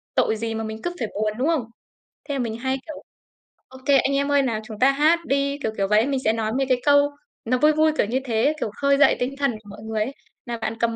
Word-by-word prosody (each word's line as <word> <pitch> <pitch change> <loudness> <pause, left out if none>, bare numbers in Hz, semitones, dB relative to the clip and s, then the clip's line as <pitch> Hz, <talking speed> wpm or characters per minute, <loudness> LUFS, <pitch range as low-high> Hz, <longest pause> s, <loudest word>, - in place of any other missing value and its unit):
tội 220 - +2
gì 225 +1 -3
mà 225 - -3
mình 220 0 -6
cứ 350 - -2
phải 230 - -1
buồn, 215 0 -1
đúng 265 +5 0
không? 320 -7 +1 0.7
Thế 285 - -1
là - - -2
mình 225 -2 -2
hay, 265 +2 -1
kiểu: 310 - -8 0.6
"OK 260 0 -15 0.2
anh 275 0 +1
em 280 +1 0
ơi, 285 -1 +4
nào 230 -5 -1
chúng 215 -2 -9
ta 270 +2 +5
hát 310 +4 +3
đi", 280 +1 0
kiểu, 220 - 0
kiểu 195 0 +1
vậy. 210 +3 +3
Mình 270 -2 0
sẽ 220 - +2
nói 220 -1 -2
về 270 - +2
cái 250 -1 +2
câu 285 0 +5 0.4
nó 250 +2 +1
vui 300 +3 +5
vui, 310 0 +3
kiểu - - +3
như 250 +5 -1
thế, 235 +5 +1
kiểu, 210 - -2
khơi 280 0 +3
dậy 290 - +5
tinh 260 +3 -2
thần 275 -2 +1
của 215 -2 -11
mọi 200 - -10
người 220 -1 -2
ấy 265 +5 -5 0.3
"Nào 235 -1 -4
bạn 225 0 -3
cầm 230 -1 0
255 Hz, 275 wpm, -23 LUFS, 220-280 Hz, 0.7 s, ta